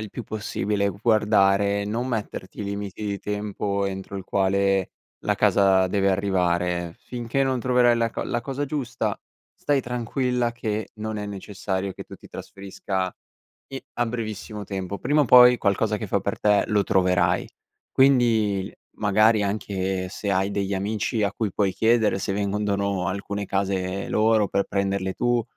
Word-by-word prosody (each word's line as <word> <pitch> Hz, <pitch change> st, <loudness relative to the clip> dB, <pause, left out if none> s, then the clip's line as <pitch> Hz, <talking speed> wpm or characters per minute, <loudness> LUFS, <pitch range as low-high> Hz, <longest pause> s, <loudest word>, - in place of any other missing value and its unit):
il 110 Hz, -1 st, -6 dB
più 125 Hz, -, -6 dB
possibile, 105 Hz, -1 st, -1 dB
guardare 100 Hz, -1 st, +2 dB
e -, -, -4 dB
non 115 Hz, +5 st, -2 dB
metterti 105 Hz, -4 st, -4 dB
limiti 100 Hz, +1 st, -5 dB
di 100 Hz, -1 st, -3 dB
tempo 105 Hz, -1 st, -2 dB
entro 95 Hz, +1 st, -5 dB
il 95 Hz, -, -6 dB
quale 95 Hz, 0 st, +1 dB, 0.3 s
la -, -, 0 dB
casa 95 Hz, -2 st, +4 dB
deve 100 Hz, +1 st, +1 dB
arrivare, 90 Hz, -3 st, 0 dB
finché 125 Hz, +2 st, -2 dB
non 130 Hz, -2 st, 0 dB
troverai 125 Hz, -1 st, +4 dB
la 115 Hz, 0 st, +1 dB
co -, -, -4 dB
la 120 Hz, -, -1 dB
cosa 135 Hz, +3 st, -3 dB
giusta 135 Hz, -4 st, -2 dB, 0.4 s
stai 145 Hz, -2 st, 0 dB
tranquilla, 125 Hz, 0 st, -1 dB
che 110 Hz, -3 st, -3 dB
non 110 Hz, 0 st, -4 dB
è 105 Hz, 0 st, -4 dB
necessario 95 Hz, -1 st, -4 dB
che -, -, -8 dB
tu -, -, -12 dB
ti -, -, -16 dB
trasferisca 95 Hz, -1 st, -5 dB, 0.5 s
i 135 Hz, 0 st, -6 dB
a 120 Hz, -, 0 dB
brevissimo 110 Hz, -2 st, -5 dB
tempo. 95 Hz, 0 st, -4 dB
Prima 145 Hz, +4 st, +2 dB
o -, -, 0 dB
poi 125 Hz, 0 st, +8 dB
qualcosa 105 Hz, +1 st, +1 dB
che 105 Hz, -1 st, -6 dB
fa 100 Hz, -, +2 dB
per 100 Hz, +1 st, -3 dB
te 105 Hz, -1 st, +4 dB
lo 105 Hz, -1 st, +2 dB
troverai. 90 Hz, -1 st, +2 dB, 0.4 s
Quindi 115 Hz, -7 st, +3 dB, 0.2 s
magari 110 Hz, +1 st, +3 dB
anche 95 Hz, -2 st, -2 dB
se 100 Hz, +1 st, -4 dB
hai 95 Hz, +1 st, +1 dB
degli 100 Hz, -1 st, -1 dB
amici 105 Hz, +3 st, -1 dB
a 100 Hz, -, +1 dB
cui 110 Hz, -3 st, -2 dB
puoi 100 Hz, -3 st, +1 dB
chiedere 110 Hz, -1 st, +2 dB
se 95 Hz, -, -2 dB
vendono 100 Hz, -2 st, -1 dB
alcune 100 Hz, +1 st, -4 dB
case 95 Hz, -1 st, -1 dB
loro 110 Hz, -1 st, +3 dB
per 100 Hz, -, +1 dB
prenderle 100 Hz, -1 st, -1 dB
tu, 120 Hz, -1 st, +1 dB
100 Hz, 160 wpm, -24 LUFS, 95-115 Hz, 0.5 s, poi